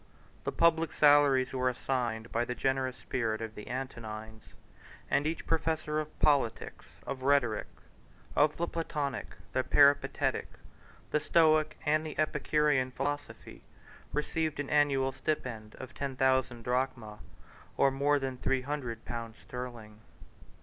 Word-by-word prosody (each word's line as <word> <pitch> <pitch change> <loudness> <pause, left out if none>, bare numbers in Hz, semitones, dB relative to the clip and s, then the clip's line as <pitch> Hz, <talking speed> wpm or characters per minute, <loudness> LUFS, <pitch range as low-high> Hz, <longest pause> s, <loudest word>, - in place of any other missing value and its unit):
The - - 0
public 165 -1 +3
salaries 145 -3 +5
were 130 -1 +1
assigned 120 -3 -2
by 115 - +1
the 125 +1 -4
generous 130 -1 0
spirit 110 -3 -2
of 110 -1 -5
the 105 - -10
Antonines; 110 -4 -7 0.6
and 145 - +2
each 160 - -3
professor 160 -1 0
of 155 0 -6
politics, 140 -7 +1 0.2
of 135 -1 -5
rhetoric, 130 -6 +2 0.7
of 150 +1 +3
the 170 - -1
Platonic, 150 -5 -3 0.2
the 130 - +1
Peripatetic, 145 +1 +3 0.6
the 150 - +3
Stoic, 155 0 +3
and 155 +1 +2
the 155 - -7
Epicurean 150 -3 +2
philosophy, 145 +2 -5 0.5
received 155 0 -1
an 145 - -3
annual 140 -3 +3
stipend 125 -6 -4
of 130 - -9
ten 140 -2 -4
thousand 130 -2 +1
drachmae, 125 -4 -2 0.6
or 135 - +4
more 145 +2 +2
than 135 -2 -3
three 130 0 0
hundred 130 -5 -4
pounds 115 -1 -6
sterling. 120 -4 -8
135 Hz, 130 wpm, -31 LUFS, 120-150 Hz, 0.7 s, salaries